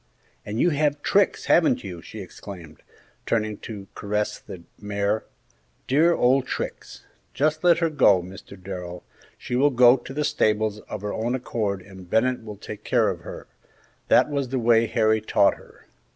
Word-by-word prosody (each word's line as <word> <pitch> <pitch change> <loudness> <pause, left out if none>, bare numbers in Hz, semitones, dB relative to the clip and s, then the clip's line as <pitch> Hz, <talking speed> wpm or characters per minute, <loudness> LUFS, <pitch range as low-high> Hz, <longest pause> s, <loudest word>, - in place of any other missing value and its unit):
"And 105 +2 -4
you 175 - +3
have 145 0 0
Trix, 200 -1 +2
haven't 165 -7 +3
you?" 90 -3 -7
she 105 +4 -9
exclaimed, 85 -4 -11 0.5
turning 110 -2 0
to 105 -4 -8
caress 105 +1 -2
the 85 - -11 0.2
mare. 105 +1 -1 0.6
"Dear 160 +6 +3
old 130 +1 +2
Trix! - - -6 0.3
Just 155 +3 0
let 175 -1 +5
her 165 -1 +1
go, 115 -10 +5
Mr. 95 +1 -11
Darrell; 90 -2 -7 0.3
she 125 - -4
will 140 +4 +4
go 125 -1 +6
to 120 - -11
the 150 +2 -1
stables 110 -3 +1
of 105 - -5
her 105 - -3
own 120 +3 -1
accord 105 -6 -3
and 95 -2 -13
Bennett 125 +3 +1
will 105 -2 -8
take 105 +1 -9
care - - +2
of - - -7
her; - - -9 0.6
that - - +5
was 140 -3 -2
the 130 - -1
way 115 -1 +3
Harry 110 -1 +2
taught 100 -2 +3
her. - - -18
110 Hz, 170 wpm, -24 LUFS, 100-130 Hz, 0.6 s, go